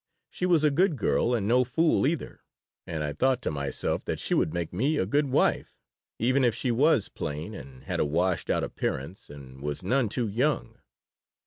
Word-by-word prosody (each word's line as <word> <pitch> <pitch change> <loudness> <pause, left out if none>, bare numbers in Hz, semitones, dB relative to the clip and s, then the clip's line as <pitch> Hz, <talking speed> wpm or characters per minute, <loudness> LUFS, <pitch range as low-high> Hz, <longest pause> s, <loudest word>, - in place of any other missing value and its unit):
She 180 - -2
was 170 -4 +3
a 150 - +4
good 175 +3 +2
girl, 125 -2 +1
and 105 -4 -1
no 125 +3 +4
fool, 155 +3 +2
either, 165 +2 -4 0.4
and 80 -3 -3
I 75 -1 -2
thought 130 - +2
to - - -1
myself 70 -2 -2
that - - -2
she - - -2
would 80 - +2
make 85 0 -3
me 135 - +1
a - - +1
good 145 +9 +1
wife, 130 - +1 0.4
even 130 +4 +2
if 120 -3 +3
she 125 - -1
was 135 -1 +3
plain 75 +8 -5
and 65 -8 -11
had - - -3
a - - +2
washed 85 +4 0
out - - +1
appearance 70 +8 -4
and 65 -2 -12
was 75 +4 -3
none 120 +3 +1
too 120 +2 -1
young. 110 - -1
115 Hz, 200 wpm, -27 LUFS, -, 0.4 s, a